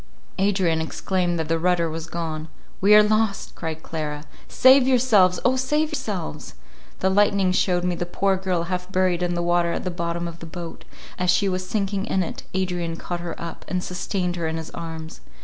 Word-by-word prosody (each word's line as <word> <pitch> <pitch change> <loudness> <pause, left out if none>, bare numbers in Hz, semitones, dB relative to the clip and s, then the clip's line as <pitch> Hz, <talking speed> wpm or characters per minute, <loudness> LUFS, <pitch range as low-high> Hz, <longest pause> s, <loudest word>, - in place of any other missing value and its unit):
Adrian 190 -5 +2
exclaimed 175 +2 -1
that 160 -1 -2
the 165 +1 +1
rudder 175 -1 +2
was 160 0 -5
gone;—"We 165 +5 0
are 210 - +9
lost," 215 -1 0
cried 160 -1 -5
Clara, 150 -2 -4 0.2
"Save 260 0 +6
yourselves—O 240 -3 +4
save 300 +4 +1
yourselves!" 210 - -5 0.5
The 190 - +3
lightning 200 -1 +3
shewed 180 -1 +1
me 180 0 +1
the 175 0 -3
poor 195 +2 +1
girl 185 -2 -1
half 180 +1 -4
buried 185 -2 +2
in 175 0 0
the 175 - -1
water 175 0 +2
at - - -3
the 185 - -2
bottom 170 0 -3
of 170 0 -8
the 165 - -8
boat; 170 0 -8 0.3
as 180 0 +1
she 180 +3 +3
was 185 -1 -2
sinking 200 -2 -1
in 190 - +1
it 165 - -6
Adrian 175 -3 -1
caught 175 +1 -5
her 170 -1 -6
up, 170 0 -7
and 180 -1 -2
sustained 180 -1 -2
her 165 -1 -1
in 160 0 -2
his 160 -1 -6
arms. 160 -1 -7
180 Hz, 190 wpm, -24 LUFS, 170-195 Hz, 0.5 s, are